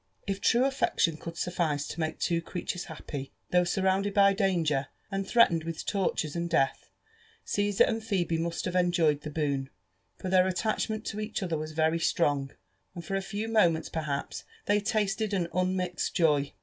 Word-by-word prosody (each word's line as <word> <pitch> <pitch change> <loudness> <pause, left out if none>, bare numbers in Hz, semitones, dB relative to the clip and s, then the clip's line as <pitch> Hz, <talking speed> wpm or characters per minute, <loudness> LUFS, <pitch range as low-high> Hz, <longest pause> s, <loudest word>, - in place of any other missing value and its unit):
If 195 -1 -3
true 245 +2 +4
affection 265 - +1
could 165 +2 -8
suffice 160 -5 -1
to - - -6
make 160 -1 -2
two 170 -1 0
creatures 180 +1 -4
happy 145 -4 -7 0.2
though 180 0 +5
surrounded 190 +2 +1
by 200 -1 +6
danger 170 -9 +1 0.2
and 195 0 -2
threatened 175 -9 +4
with 165 0 -5
tortures 180 -6 -1
and 170 0 -2
death, 135 -5 +1 0.6
Caesar 205 -1 +2
and 225 -1 -1
Phebe 175 -6 0
must 170 0 -2
have 180 - -3
enjoyed 175 -5 +3
the 150 - -6
boon, 140 -3 -1 0.5
for - - -6
their 185 0 +4
attachment 215 +3 -1
to 210 - -4
each 215 -1 -3
other 170 -3 -1
was 155 0 -4
very 160 +1 +2
strong, 145 -5 +1 0.5
and 170 -1 -7
for 195 - -2
a 195 - 0
few 205 +3 -4
moments 175 -8 +2
perhaps 150 -3 -3 0.2
they 205 0 +3
tasted 210 0 0
an 175 -3 0
unmixed 185 -1 -1
joy. 150 -4 +3
175 Hz, 175 wpm, -29 LUFS, 160-195 Hz, 0.6 s, by